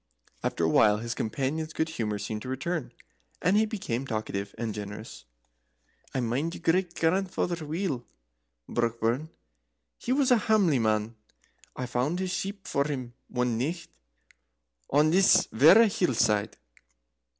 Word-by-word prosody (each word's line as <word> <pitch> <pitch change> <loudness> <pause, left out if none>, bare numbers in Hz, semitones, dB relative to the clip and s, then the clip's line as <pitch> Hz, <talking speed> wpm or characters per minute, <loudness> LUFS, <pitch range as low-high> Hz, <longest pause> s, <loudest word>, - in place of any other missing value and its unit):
After - - -1
a - - +4
while 105 -1 +5
his 115 +2 -4
companion's 145 +9 -2
good 160 - -1
humour 110 -9 -2
seemed 105 +1 -4
to 125 - -7
return, 145 +3 -3 0.5
and 180 +4 +2
he 220 +1 +4
became 135 - -3
talkative 100 -3 -4
and 115 -2 -3
generous. 105 - -8 0.9
"I 130 - -1
mind 135 +8 -1
your - - -10
great 175 +1 +1
grandfather 175 -1 0
weel, 155 - -3 0.6
Brockburn. 120 +5 -1 0.7
He 245 - -3
was 265 -1 +3
a 245 - +6
hamely 200 - +3
man, 110 0 0 0.6
I 130 - -3
found 125 +7 -1
his 185 0 -2
sheep 195 +1 -4
for 140 0 +1
him 130 -5 -4
one 125 -2 -1
nicht 165 +7 -3 1.0
on 150 +3 +4
this 185 0 +5
verra 165 - +8
hill 190 - 0
side. 105 -2 +1
140 Hz, 140 wpm, -28 LUFS, 115-180 Hz, 1.0 s, verra